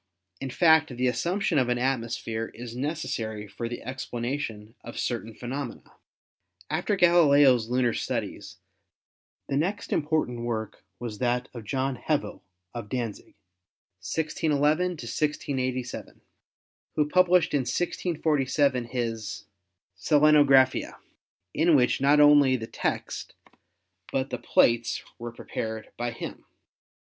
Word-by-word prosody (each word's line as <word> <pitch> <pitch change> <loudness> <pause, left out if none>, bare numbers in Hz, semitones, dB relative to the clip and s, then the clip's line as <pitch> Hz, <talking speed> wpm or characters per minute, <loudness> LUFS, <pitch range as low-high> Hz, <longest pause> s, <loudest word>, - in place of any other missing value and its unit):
In 135 - -4
fact, 160 +3 +4
the 125 0 -2
assump 170 - 0
tion 155 - +2
of 125 -2 +1
an 120 - +1
atmosphere 115 -3 -2
is 120 0 -8
necessary 120 -7 -3
for 115 +3 -5
the 120 - -6
explanation 120 -3 -4
of - - -9
certain 115 -2 -3
phenomena. 125 +1 -6 0.8
After 205 - 0
Galileo's 145 - +5
lunar 125 -1 +2
studies - - -4 0.9
the 135 - -1
next 190 +8 -1
important 150 -6 0
work 110 -2 -4
was 115 -3 -6
that 125 0 0
of 115 -3 -8
John 130 +3 -1
Hevel, 150 +4 -2 0.3
of 115 -3 -6
Danzig 120 -4 -4 0.7
(1611 155 - +1
1687), 130 -3 -3 0.7
who 150 -1 +2
pub 185 +4 +4
lished 180 -2 +3
in 145 - +3
1647 140 -3 0
ms 115 -4 -3 0.5
Selenographia, 140 +3 +4 0.6
in 165 0 +4
which 125 -1 +3
not 145 +2 +5
only 145 -3 +6
the 115 -3 -4
text - - -4 0.8
but 135 0 -1
the 125 - -3
plates 120 -1 +2 0.2
were 120 0 -5
prepared 110 -1 -6
by 120 +1 -2
him. 115 - -7
130 Hz, 120 wpm, -27 LUFS, 120-150 Hz, 0.9 s, only